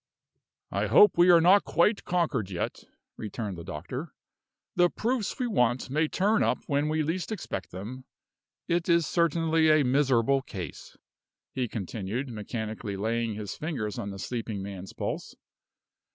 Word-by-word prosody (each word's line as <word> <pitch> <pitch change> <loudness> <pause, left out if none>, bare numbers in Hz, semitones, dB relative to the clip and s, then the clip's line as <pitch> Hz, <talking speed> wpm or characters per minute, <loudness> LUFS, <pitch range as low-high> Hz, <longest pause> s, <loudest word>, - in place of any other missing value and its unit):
"I - - 0
hope 210 - +7
we 175 +1 +5
are 175 -1 +8
not 185 +5 +6
quite 200 +6 +2
conquered 155 - 0
yet," 90 -3 -4 0.3
returned 105 -2 -4
the 85 - -8
doctor. 100 - -6 0.6
"The 175 0 +5
proofs 230 +1 -1
we 255 - -1
want 125 - +1
may 155 +3 +2
turn 205 +7 +2
up - - +2
when 145 -1 0
we 155 0 +1
least 170 +7 -2
expect 95 - -4
them. 115 +9 -8 0.6
It 170 +1 0
is 170 -1 +4
certainly 165 -1 +2
a 155 -2 +5
miserable 135 0 +3
case," 90 - -8 0.6
he 130 -2 -1
continued, 110 +5 -4
mechanically 110 -2 -5
laying 115 +1 -1
his 105 -2 -5
fingers 120 - -3
on 100 - -4
the 100 - -7
sleeping 110 -2 -4
man's 95 -1 -7
pulse. - - -4
130 Hz, 150 wpm, -28 LUFS, 105-170 Hz, 0.6 s, are